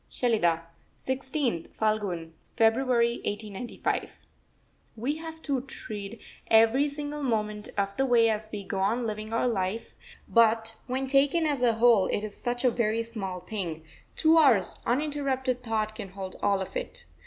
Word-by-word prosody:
SHELIDAH, 175 -9 +1 0.4
16th 260 - -2
(Phalgun) 200 -7 0 0.3
February 235 +1 +3
1895. 210 +2 -3 0.9
We 260 +7 -2
have 320 0 -8
to 275 -4 0
tread 215 -5 -7 0.3
every 225 +6 +5
single 295 +1 -5
moment 210 -5 -1
of 200 0 0
the 270 - +2
way 235 -2 +5
as 215 -1 -1
we 205 -2 -5
go 195 0 -3
on 225 +5 +1
living 215 0 -4
our 230 +2 +1
life, 205 -1 -2 0.4
but 225 -1 +3
when 260 +1 -1
taken 280 +5 +3
as 290 -4 0
a 240 -2 +4
whole 225 -3 +5
it 205 - -1
is 215 -1 -6
such 245 +1 -2
a 250 - +5
very 230 -1 0
small 195 -6 -5
thing, 180 -5 -5 0.3
two 325 0 +5
hours 235 - +4
uninterrupted 265 -2 0
thought 220 -2 -1
can 200 -2 -7
hold 190 0 -7
all 200 -1 +2
of 190 - -6
it. - - -5
230 Hz, 155 wpm, -28 LUFS, 210-260 Hz, 0.9 s, every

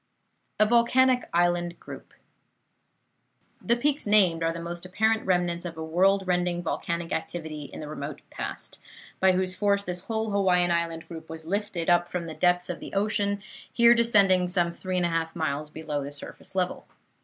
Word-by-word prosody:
A 215 - +6
VOLCANIC 250 +3 +3
ISLAND 175 0 +1
GROUP - - -11 1.5
The 235 - +2
peaks 285 +1 0
named 190 -6 +4
are 165 0 +1
the 170 - -6
most 170 +1 -6
apparent 220 +4 0
remnants 175 -2 +1
of 170 -2 -7
a 160 - -4
world 190 +4 +3
rending 180 -1 0
volcanic 170 0 -3
activity 155 -3 -4
in 140 - -9
the 150 - -6
remote 150 -1 -6
past, - - -6 0.4
by 190 0 +5
whose 185 0 +1
force 200 +1 +1
this 180 -2 -4
whole 220 +3 -3
Hawaiian 180 -3 +3
island 165 -1 -1
group 160 -1 -9
was 160 0 -7
lifted 195 -2 -2
up 175 0 +3
from 180 -2 -3
the 160 - -6
depths 180 +1 +2
of 180 - -4
the - - -9
ocean, 200 -1 0 0.3
here 235 0 +6
descending 200 -6 +4
some 175 -2 0
three 185 +1 -3
and 180 - +2
a - - +1
half 165 -1 -2
miles 150 -2 -2
below 150 -2 -4
the 140 - -6
surface 145 +6 -8
level. 180 -1 -2
180 Hz, 180 wpm, -26 LUFS, 165-200 Hz, 1.5 s, A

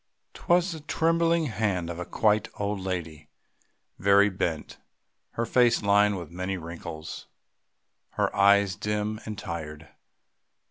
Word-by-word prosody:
'Twas 175 +1 +1
the 160 - -6
trembling 165 +2 +1
hand 100 - -1
of 85 0 -6
a 90 - -4
quite 105 -1 +2
old 100 -1 -2
woman, 80 -5 -5 0.7
very 100 +1 +5
bent, 80 -5 -3 0.5
her 115 - -1
face 120 -1 +3
lined 100 0 +3
with 85 -3 -8
many 95 +2 -3
wrinkles, 85 -2 -8 0.9
her - - -1
eyes 100 -1 +4
dim 105 +2 -2
and 105 -1 -5
tired. 80 -4 -7
100 Hz, 125 wpm, -27 LUFS, 85-110 Hz, 0.9 s, very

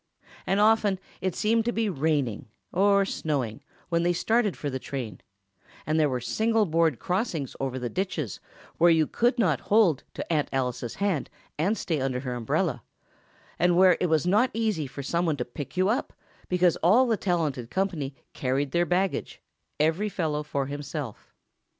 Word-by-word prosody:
And 195 - +2
often 210 -2 +4 0.2
it 185 -2 -1
seemed 225 +1 +2
to 240 - +1
be 225 -2 0
raining, 145 - -1 0.3
or 200 +1 +4
snowing, 135 - -2 0.3
when 170 -1 +2
they 175 +1 +2
started 220 +2 +1
for 145 - -4
the 130 -2 -3
train, 125 -5 -6 0.6
and 155 +1 +1
there 150 -2 +3
were 130 -1 -1
single 220 - +1
board 165 -5 +2
crossings 180 - -2
over 130 -1 -2
the 125 -1 -3
ditches, 165 - -3 0.4
where 175 - +6
you 160 -2 +4
could 240 - +1
not 175 - +2
hold 200 -9 +4
to - - -3
Aunt 150 -2 +1
Alice's 125 -3 -2
hand 200 -8 -1 0.3
and 195 +8 +1
stay 160 -8 -1
under 130 -1 -1
her 130 -2 -4
umbrella, 120 -2 -1 0.8
and 175 0 +3
where 185 -1 +7
it 180 - +1
was 160 -1 +2
not 210 +8 +3
easy 215 -10 0
for 140 +2 -7
someone 170 +1 0
to 125 - -2
pick 145 +7 -8
you 185 +1 +3
up, 230 +5 -1 0.4
because 180 -1 +3
all 210 +10 +5
the 230 -3 +2
talented 160 - -1
company 165 -8 -2 0.2
carried 135 +1 -1
their 175 +2 +2
baggage, 185 +2 -1 0.4
every 165 +8 +2
fellow 155 -6 -1
for 140 -2 -2
himself. 145 -3 -6
165 Hz, 170 wpm, -27 LUFS, 140-195 Hz, 0.8 s, where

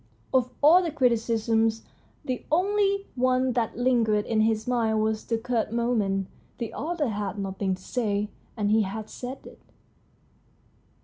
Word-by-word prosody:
Of 255 -1 +3
all 335 +5 +8
the 345 - -1
criticisms, 225 -4 +1 0.4
the 255 -1 -3
only 395 +3 +2
one 255 0 +2
that 230 -3 -1
lingered 230 -4 +2
in 220 -2 +1
his 220 0 +1
mind 225 -3 +1
was 220 0 -1
the 230 - 0
curt 230 -1 -1
comment, 215 -5 0 0.2
" - - -34
The 235 -2 -5
author 310 -3 -2
had 205 -1 -3
nothing 195 -1 -2
to 185 - -17
say, 210 -4 -1 0.3
and 205 -1 +1
he 220 +1 +5
has 210 +2 -4
said 255 +2 -7
it." - - -13
230 Hz, 150 wpm, -26 LUFS, 215-255 Hz, 0.4 s, all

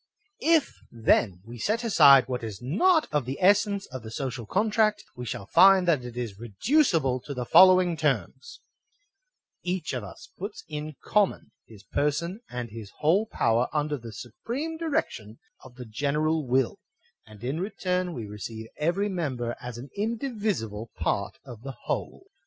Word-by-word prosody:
If, 325 -2 +3 0.2
then, 105 -5 +1
we 120 +1 -10
set 220 - 0
aside 140 - +7
what 125 -2 -3
is 110 -4 -6
not 310 - +2
of 145 -4 0
the 135 +2 -4
essence 200 +1 +3
of 130 -1 -6
the 110 - -9
social 120 -1 -4
contract, 215 - +1
we 125 -1 -7
shall 100 - -5
find 190 - +6
that 150 -7 +3
it 120 -1 -8
is 110 -5 -5
reducible 135 - +1
to 140 +3 -8
the 125 -1 -3
following 185 +2 +6
terms: 140 - -2 1.0
•Each 180 -4 -2
of 125 - -4
us 100 - -11
puts 200 +4 -6
in 150 -1 -6
common 205 -2 +1 0.2
his 105 -3 -15
per 145 +7 +1
son 170 +7 -4
and 125 -2 -5
his 110 -2 -8
whole 180 +9 +2
power 115 - +1
under 150 -1 0
the 115 -1 -9
supreme 240 - -5
direction 275 - -3 0.3
of 130 -2 -14
the 125 -1 -8
general 150 +6 0
will; 130 +10 +1 0.5
and 105 0 -14
in 135 +6 -2
return 180 -2 -2
we 115 -4 -5
receive 110 +2 -7
every 175 +7 0
member 130 - -3
as 125 -2 -7
an 125 +3 -9
indivisible 210 - -2
part - - -1
of 115 -3 -10
the 135 +1 -7
whole. - - -4
140 Hz, 165 wpm, -27 LUFS, 120-190 Hz, 1.0 s, aside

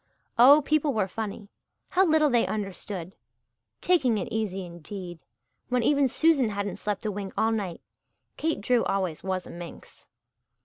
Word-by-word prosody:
Oh, 285 +5 +8
people 305 -1 +2
were 210 -3 +1
funny! 205 +1 -5 0.4
How 380 +1 +3
little 310 -2 +4
they 240 -1 +3
understood. 195 -3 -5 0.7
"Taking 270 -11 +3
it 190 - -3
easy," 195 -4 -2
indeed 175 +1 -8 0.5
when 250 -1 +1
even 280 +2 +3
Susan 280 -3 +3
hadn't 200 -1 -3
slept 210 0 -3
a 215 - 0
wink 200 -1 -6
all 225 - +2
night! 195 -6 -3 0.5
Kate 315 -9 -1
Drew 240 +2 +2
always 185 -5 -1
was 185 -1 -2
a - - -10
minx. 170 0 -11
210 Hz, 150 wpm, -27 LUFS, 190-265 Hz, 0.7 s, Oh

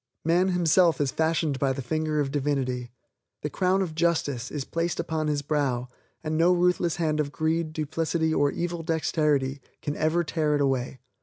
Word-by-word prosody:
Man 175 +3 +3
himself 175 -3 +3
is 140 -3 +1
fashioned 160 -3 0
by 135 -1 +2
the 135 - -4
finger 155 +3 -1
of 140 -2 0
Divinity. 135 -4 -1 0.5
The 150 - -2
crown 190 +1 +2
of 170 -4 -5
justice 155 -6 0
is 145 -3 -4
placed 165 +1 -2
upon 155 -1 -1
his 145 -1 0
brow 135 -4 -1 0.3
and 155 0 -2
no 165 +3 +4
ruthless 175 -2 +2
hand 155 -2 0
of 145 -2 -1
greed, 160 +1 -1
duplicity 160 +1 -1
or 145 -2 +3
evil 170 +2 -3
dexterity 150 -4 0 0.2
can 145 - -3
ever 160 +3 +1
tear 155 -2 0
it 145 - +1
away. 135 -2 0
155 Hz, 175 wpm, -26 LUFS, 145-165 Hz, 0.5 s, no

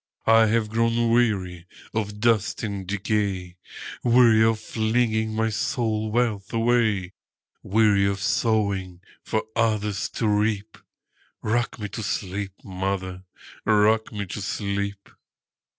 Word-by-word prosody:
I 115 0 +6
have 110 0 +1
grown 115 0 +1
weary 95 -7 +1 0.3
of 105 -1 -3
dust 115 0 +1
and 100 -3 -4
decay,—Weary 105 +4 +1
of 110 -1 +2
flinging 110 0 0
my 110 0 +1
soul 110 -1 -1
wealth 110 -3 -1
away; 115 -5 +1 0.5
Weary 100 -1 +3
of 100 0 -1
sowing 100 -4 0 0.2
for 110 - -1
others 105 -4 0
to 115 - +1
reap;—Rock 110 +2 -3
me 105 -3 -4
to 110 - -6
sleep, 100 -2 -3
mother,—rock 95 +3 -1
me 105 -2 -4
to 100 +2 -6
sleep! 100 0 -3
105 Hz, 105 wpm, -24 LUFS, 100-115 Hz, 0.5 s, I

